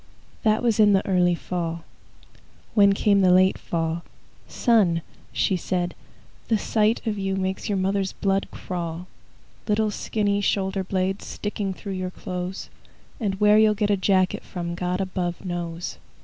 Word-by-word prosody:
That 220 0 +2
was 230 -3 +2
in 210 -1 +6
the 195 - +2
early 180 -2 +3
fall. 170 -1 -4 0.9
When 200 -2 +6
came 200 0 +3
the 185 - +5
late 185 +1 +4
fall, 165 0 -2 0.5
"Son," 195 - +2 0.3
she 190 - +1
said, 175 0 -1 0.5
"the 225 - +3
sight 215 +3 +1
of 210 -2 -1
you 195 0 -1
Makes 190 +3 -2
your 200 - +1
mother's 195 0 0
blood 195 0 0
crawl,– 170 -1 -5 0.6
"Little 215 0 +2
skinny 205 -1 0
shoulder 195 -1 0
blades 190 +1 -2
Sticking 205 -1 -3
through 200 +1 -6
your 185 -1 -3
clothes! 180 +1 -6 0.5
And 195 -5 -2
where 210 0 +6
you'll 215 -1 +5
get 210 0 +1
a - - +4
jacket 185 -1 +2
from 170 -1 -5
God 180 +2 -2
above 185 -1 -3
knows. 175 -1 -4
190 Hz, 150 wpm, -24 LUFS, 180-205 Hz, 0.9 s, in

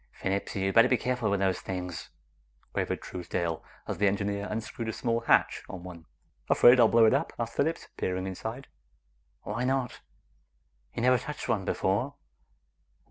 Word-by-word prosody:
"Phillips, 100 +1 -3
you 95 -1 0
better 115 +2 +7
be 125 - +3
careful 125 -4 -1
with 100 -1 +1
those 95 -1 +1
things!" 90 -3 -5 0.6
quavered - - -2
Truesdale 85 -2 -3 0.2
as - - -4
the 100 - +4
engineer 100 +1 -1
unscrewed 115 +1 -4
a - - -3
small 115 0 0
hatch 115 - +3
on 90 -2 -7
one. 85 -3 -10 0.4
"Afraid 125 +1 +7
I'll 115 - +8
blow 115 0 +5
it 110 - +5
up?" - - 0
asked 115 -1 -3
Phillips, 160 +4 0
peering 95 0 -2
inside. 110 +7 -6 0.8
"Why 105 +4 -3
not? 130 -1 -1 0.9
You 115 - -2
never 125 0 +5
touched 150 +5 -6
one 95 -3 0
before." 110 +13 0
105 Hz, 160 wpm, -29 LUFS, 95-120 Hz, 0.9 s, I'll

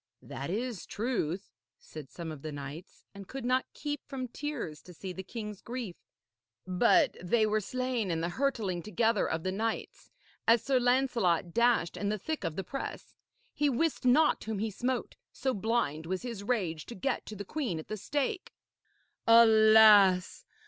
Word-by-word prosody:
'That 140 - -6
is 225 +1 -3
truth,' 205 -6 -2 0.3
said 150 -4 -11
some 170 -2 -7
of 150 -3 -9
the 155 - -5
knights, 145 +5 -9
and 200 -1 -10
could 265 -2 -6
not 255 +1 +1
keep 290 -1 -4
from 265 -3 -4
tears 245 - -5
to 180 - -14
see 185 +2 -6
the 190 - -6
king's 210 0 -7
grief, 235 -7 -5 0.7
'but 235 - +3
they 215 +5 +2
were 215 0 +1
slain 255 -2 -2
in 165 -2 0
the 170 +1 -1
hurtling 215 -6 -1
together 220 +3 +1
of 160 0 -2
the 185 - -1
knights, 220 +3 -3 0.4
as 230 0 +5
Sir 265 0 +2
Lancelot 240 -10 +1
dashed 235 -7 +2
in 200 - -1
the 215 - 0
thick 315 +7 -4
of 165 -3 -3
the 195 - -3
press. 275 +9 -6 0.4
He 295 -1 +1
wist 290 +5 0
not 255 +5 +4
whom 220 -1 -3
he 215 +2 -2
smote, 245 +4 -3
so 265 0 -1
blind 195 - -1
was 185 +3 -3
his 230 -5 -5
rage 185 -9 -2
to 240 - -8
get 250 +8 -1
to 215 - -7
the 200 0 -6
queen 255 - -2
at 160 - -7
the 215 - -4
stake.' 290 - -2 0.8
'Alas! 220 -4 +7
220 Hz, 175 wpm, -30 LUFS, 180-250 Hz, 0.8 s, Alas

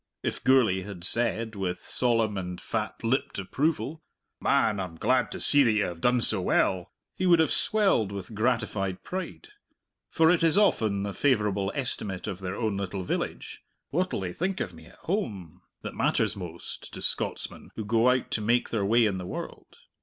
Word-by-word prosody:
If - - -3
Gourlay 115 -8 +4
had 95 -2 -8
said, 115 +2 +4
with 95 -3 -3
solemn 115 +2 0
and 90 -2 -5
fat 110 0 -4
lipped 120 +4 0
approval, 150 - -2 0.4
"Man, 105 -3 +2
I'm 90 -3 -5
glad 125 +8 +1
to - - -5
see 145 -1 +6
that 115 - +3
you 105 -1 +2
have 85 -3 -5
done 125 0 +3
so 105 -4 +3
well," 90 0 +1 0.2
he 185 - -1
would 175 -1 +6
have 160 -1 +2
swelled 200 - +2
with 100 +2 -7
gratified 105 -4 -1
pride. 185 - -6 0.6
For 160 0 +4
it 175 - +2
is 165 +3 +4
often 110 - +2
the 100 -1 -4
favourable 105 -7 +1
estimate 105 -8 -3
of 95 - -5
their 95 0 -4
own 110 -3 -1
little 95 -1 -4
village - - -4 0.3
"What 180 +5 0
they'll 90 - -3
think 185 +2 -2
of 90 - -3
me 80 0 -14
at - - -17
home" 105 - -3 0.2
that - - -5
matters - - +1
most 85 -3 -8
to - - -7
Scotsmen - - -3
who 110 - -5
go 115 +3 +3
out 125 0 0
to 110 - -1
make 120 +3 +1
their 110 -3 -1
way 115 +4 +4
in 100 -3 -1
the 90 - -6
world. - - -8
110 Hz, 185 wpm, -27 LUFS, 95-130 Hz, 0.6 s, see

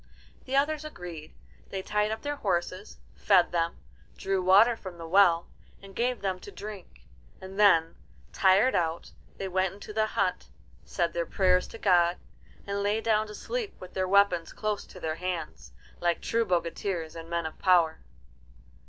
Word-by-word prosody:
The 265 - -3
others 295 +2 +1
agreed. 175 - -8 0.4
They 190 -1 -4
tied 210 +1 0
up 220 0 -4
their 290 0 -3
horses, 185 -2 -2 0.2
fed 185 -4 +3
them, 170 -1 -1 0.4
drew 195 -1 -1
water 200 +6 +6
from 185 -5 -9
the 165 -1 -8
well, 175 -2 +4 0.3
and 195 -1 -14
gave 245 0 0
them 190 -2 -2
to 205 - -11
drink; 200 - -10 0.4
and 190 +1 -9
then, 165 -6 +5 0.4
tired 195 +7 +4
out, 165 -1 -1 0.3
they 195 - -4
went 185 0 0
into 205 +1 -10
the 215 0 +1
hut, 195 -5 -1 0.4
said 170 -2 -1
their 170 -1 -2
prayers 185 -1 +2
to - - -10
God, 175 -4 +3 0.5
and 200 0 -2
lay 205 +2 +1
down 220 -1 +1
to 210 - -9
sleep 475 - -5
with 185 0 -11
their 185 -1 -1
weapons 185 -3 +3
close 215 -1 -3
to 185 - -12
their 160 -2 -3
hands, 165 - -5 0.3
like 175 -1 +1
true 230 0 0
bogatirs 170 -2 -2
and 165 0 -9
men 170 -1 -1
of 160 - -7
power. 175 -4 +3
190 Hz, 170 wpm, -28 LUFS, 170-210 Hz, 0.5 s, water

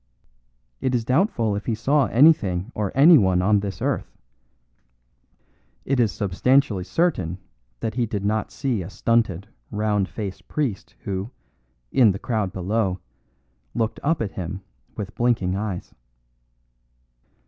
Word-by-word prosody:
It 130 -1 0
is 115 -2 -1
doubtful 125 - +1
if 100 - -5
he 115 - +1
saw 135 +5 +2
anything 115 - +3
or 105 -3 -2
anyone 135 - +6
on 105 +1 +4
this 100 -3 -5
earth; - - -2 1.7
it 135 -1 +1
is 115 -4 +3
substantially 105 +1 +1
certain 95 - 0 0.4
that 110 - -2
he 120 0 0
did 100 -2 -3
not 110 +1 0
see 130 -7 -2
a 90 - -7
stunted, 105 -4 0 0.2
round 105 -2 0
faced 100 -4 -6
priest 130 -10 -3
who, 95 +2 -4 0.6
in 115 -7 +5
the - - -4
crowd 110 -4 -2
below, 95 0 -1 0.8
looked 110 -1 -1
up 155 -4 +1
at 100 - -4
him 95 +1 -5 0.4
with 100 -2 -5
blinking 115 -7 +1
eyes. 100 -3 -4
105 Hz, 130 wpm, -23 LUFS, 95-125 Hz, 1.7 s, anyone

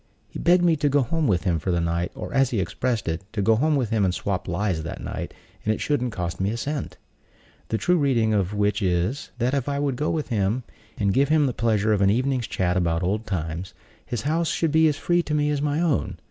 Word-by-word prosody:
He - - -8
begged 175 +1 +4
me 170 -2 +4
to 145 0 +1
go 140 0 +3
home 160 +5 0
with 95 -5 +1
him 85 -4 +1
for 95 - -4
the 85 -1 +2
night, 85 +1 -1
or, - - -6
as 135 -2 +3
he 115 - -1
expressed 115 +3 -1
it, 80 +2 -2
"to 105 - -1
go 110 +2 +4
home 150 +6 +2
with 125 -5 -1
him 110 -3 +2
and 95 - +2
swap 95 +1 -3
lies 90 -2 -1
that 85 - -6
night, - - -5 0.3
and 110 - +1
it - - -8
shouldn't 125 -5 0
cost 90 -5 -4
me 95 - +1
a 115 - -2
cent;" 145 +3 -4 0.7
the 110 - -1
true 180 +9 +2
reading 120 -6 +2
of 100 -3 +1
which 105 0 0
is, 95 +8 0
that 125 +2 0
if 140 -1 0
I 140 - -1
would 140 -3 -1
go 150 - -1
home - - 0
with 155 -4 -3
him, 110 +2 0 0.3
and 100 -2 +1
give 140 +3 +3
him 155 -1 +4
the 130 - 0
pleasure 110 -1 +1
of 100 - +1
an 100 - +5
evening's 125 +2 +1
chat 90 -1 0
about 85 -1 +1
old 105 +5 -1
times, 85 -1 -4 0.3
his 120 -4 -4
house 160 +3 0
should 165 -2 0
be 160 +1 +5
as 150 -2 0
free 175 +3 +2
to 150 -3 -2
me 150 0 +2
as 145 -1 -1
my 145 +1 0
own. 165 -4 0
115 Hz, 260 wpm, -24 LUFS, 95-145 Hz, 0.7 s, an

